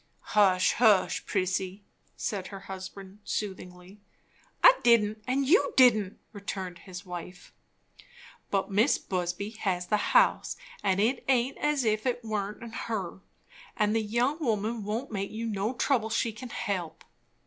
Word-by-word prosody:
"Hush, 190 -3 +4
hush, 215 -6 +3
Prissy!" 190 +1 -1 0.3
said 195 -3 -3
her 195 -1 -9
husband 190 +1 -9
soothingly. 190 -1 -6 0.6
"I - - +10
didn't 215 -2 +3
and 265 +2 +1
you 390 - +3
didn't," 220 -7 +5 0.2
returned 190 -3 -6
his 185 0 -10
wife. 180 0 -9 1.0
"But 195 0 -1
Mis' 215 +8 +3
Busby 180 +2 -3
has 180 -3 -1
the 210 +3 0
house, - - +3 0.2
and 195 -1 +1
it 240 +5 +1
aint 260 0 +1
as 295 -3 +1
if 215 +2 +1
it 245 -1 -1
warn't 215 +1 -4
her'n; 195 -5 -4 0.6
and 210 0 +2
the 225 - +2
young 240 +8 0
woman 220 -2 -1
won't 225 +6 -3
make 200 -2 -3
you 225 +1 -5
no 215 +2 -2
trouble 235 -3 +1
she 225 +1 0
can 240 +3 -9
help." 195 -9 -4
210 Hz, 140 wpm, -28 LUFS, 190-235 Hz, 1.0 s, I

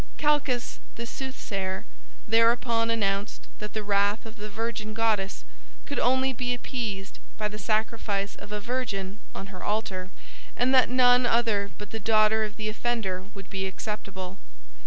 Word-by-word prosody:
Calchas, 290 -5 +1 0.2
the 235 - -4
soothsayer, 200 -8 -4 0.4
thereupon 230 +1 +4
announced 200 -3 0
that 210 0 -6
the 215 - -2
wrath 205 +1 +2
of 225 0 -9
the 210 +1 -6
virgin 215 0 -3
goddess 215 -4 +1 0.4
could 285 - -2
only 260 +1 +3
be 245 0 0
appeased 220 -6 -4 0.2
by 215 - 0
the 210 0 -7
sacrifice 215 -1 0
of 205 - -10
a 210 - -1
virgin 215 -4 -2 0.2
on 195 0 -6
her 185 - -8
altar, 195 -3 -1 0.5
and 250 +2 +3
that 255 -3 +6
none 250 -1 +6
other 225 -4 +2
but 210 - -8
the 225 - -3
daughter 215 0 +4
of 215 0 -3
the 215 -1 -3
offender 215 -4 -1
would 195 -1 -9
be 190 0 -1
acceptable. 190 -1 -5
215 Hz, 155 wpm, -28 LUFS, 200-235 Hz, 0.5 s, that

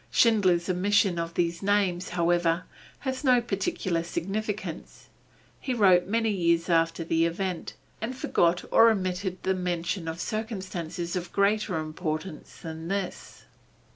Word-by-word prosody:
Schindler's 185 -7 +3
omission 190 0 +2
of 165 0 -4
these 170 -1 0
names, 195 -3 +1
however, 175 0 +1 0.4
has 260 +1 -3
no 255 -3 +5
particular 195 -6 -1
significance; 200 +5 -5 0.5
he 255 - -2
wrote 185 -5 +5
many 225 +1 +1
years 170 -3 +1
after 165 0 +2
the 165 0 +2
event, 180 +1 -4 0.3
and 245 +4 -4
forgot 175 -8 +2
or 230 - +7
omitted 185 -2 -1
the 190 - +2
mention 180 -1 -2
of 160 +1 -4
circumstances 185 -5 -4
of 175 -1 -4
greater 200 -2 +1
importance 155 +1 -5
than 160 0 -6
this. 195 0 -4
180 Hz, 130 wpm, -27 LUFS, 170-205 Hz, 0.5 s, or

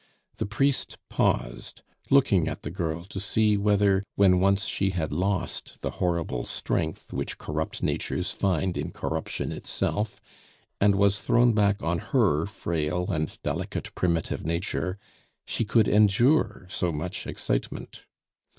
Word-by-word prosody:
The - - -2
priest 135 +6 0
paused, - - -1 0.3
looking 100 - +4
at 75 - -5
the 75 - -4
girl 85 -1 -3
to 95 0 -6
see 105 +2 +2
whether, 100 -1 +3
when 95 -2 +5
once 100 +2 +3
she 100 -3 0
had 85 -5 -2
lost 95 +4 -2
the - - -2
horrible 85 -8 0
strength 80 0 -3
which - - -3
corrupt 80 +1 -4
natures - - -1
find 95 -1 0
in - - -3
corruption - - -3
itself, 105 0 -2 0.6
and 100 0 +4
was 100 0 +3
thrown 120 0 +4
back 100 -1 +2
on 85 +1 0
her 100 - +2
frail 90 -2 -2
and 75 -3 -2
delicate - - -3
primitive 85 -3 0
nature, 90 +3 -1 0.5
she 115 - -1
could 110 0 +3
endure 105 +3 +3
so 90 -1 -1
much 80 +3 -4
excitement. - - -3
95 Hz, 135 wpm, -27 LUFS, 85-105 Hz, 0.6 s, when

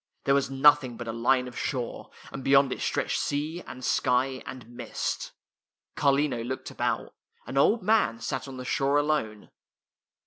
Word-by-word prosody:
There 140 - +3
was 140 -1 +2
nothing 135 -2 +4
but 120 - -7
a - - -2
line 125 +2 +2
of 125 - -10
shore, 125 -4 -4 0.2
and 135 - -7
beyond 135 0 +4
it - - -8
stretched - - 0
sea, 155 +4 -2
and 130 0 -7
sky, 130 +1 +1
and 125 -4 -8
mist. 120 -1 -4 0.6
Carlino 140 -4 +2
looked 130 +2 -5
about. - - -2 0.3
An - - -7
old 205 +11 +3
man 200 - +3
sat 130 +4 -4
on 135 -1 -8
the 125 - -7
shore 140 +2 +1
alone. 145 -9 -1
135 Hz, 165 wpm, -27 LUFS, 125-145 Hz, 0.6 s, nothing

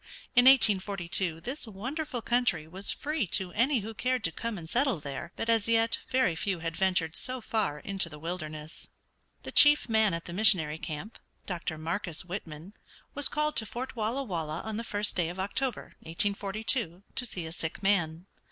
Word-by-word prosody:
In 245 - +7
1842 190 -8 +4
this 260 - -5
wonderful 250 +5 -4
country 235 -10 +1
was 190 +5 -3
free 300 -7 -2
to 180 +1 0
any 240 +5 +2
who 220 +3 -6
cared 250 +2 -1
to 165 - +1
come 230 +5 -4
and 165 -2 -8
settle 250 - +1
there, 145 +3 -6
but - - -4
as 225 -2 +2
yet 230 0 +3
very 255 -8 +2
few 185 +3 -1
had 165 0 -4
ventured 180 -4 +1
so 255 0 -1
far 215 -9 -1
into 190 +3 0
the 150 - -10
wilderness. 155 -1 -7 0.6
The - - -6
chief 295 -2 +7
man 220 -5 +3
at 170 - -6
the 170 - -6
missionary 175 -6 +4
camp, 160 +9 -6 0.3
Dr. 170 -3 -3
Marcus 170 +2 -3
Whitman, 175 -1 -7 0.4
was 285 0 +2
called 300 0 0
to 220 - +1
Fort 255 +5 -6
Walla 230 +5 -1
Walla 165 - -3
on 220 -1 -5
the 230 - -3
first 205 -2 -1
day 170 -3 0
of 180 +2 -7
October, 230 +5 -1
1842, 200 +2 -1
to 250 - 0
see 180 -6 -6
a 160 - -6
sick 165 +3 -6
man. 175 -4 +1
200 Hz, 180 wpm, -29 LUFS, 165-230 Hz, 0.6 s, In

